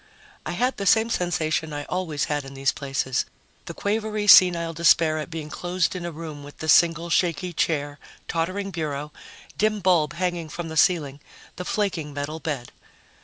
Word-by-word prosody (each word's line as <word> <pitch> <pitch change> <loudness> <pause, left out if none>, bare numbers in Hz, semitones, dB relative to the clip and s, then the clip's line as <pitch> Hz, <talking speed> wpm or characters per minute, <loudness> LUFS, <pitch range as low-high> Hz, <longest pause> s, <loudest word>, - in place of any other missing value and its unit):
I - - -3
had 250 +2 0
the 200 - -3
same 225 +3 +4
sensation 160 -4 -1
I 145 0 -4
always 165 -3 -2
had 145 -1 -1
in 135 0 -10
these 135 0 +1
places 135 -2 -2 0.4
the - - -7
quavery 215 0 -1
senile 175 -4 +7
despair 160 -1 +4
at 155 - -5
being 160 -2 -6
closed 180 0 -1
in 175 -1 -5
a - - -5
room 155 -2 -8
with 145 0 -12
the 155 - -6
single 165 +2 +4
shaky 175 +1 +1
chair, 145 -3 -1 0.3
tottering 185 +4 -2
bureau, 150 -3 -4 0.5
dim 215 0 +2
bulb 175 -6 +2
hanging 175 -2 -2
from 170 +1 -6
the 160 - -6
ceiling, 155 -5 +2 0.4
the 180 - -6
flaking 175 -9 -2
metal 145 +3 -4
bed. 140 -7 -4
165 Hz, 170 wpm, -24 LUFS, 150-180 Hz, 0.5 s, senile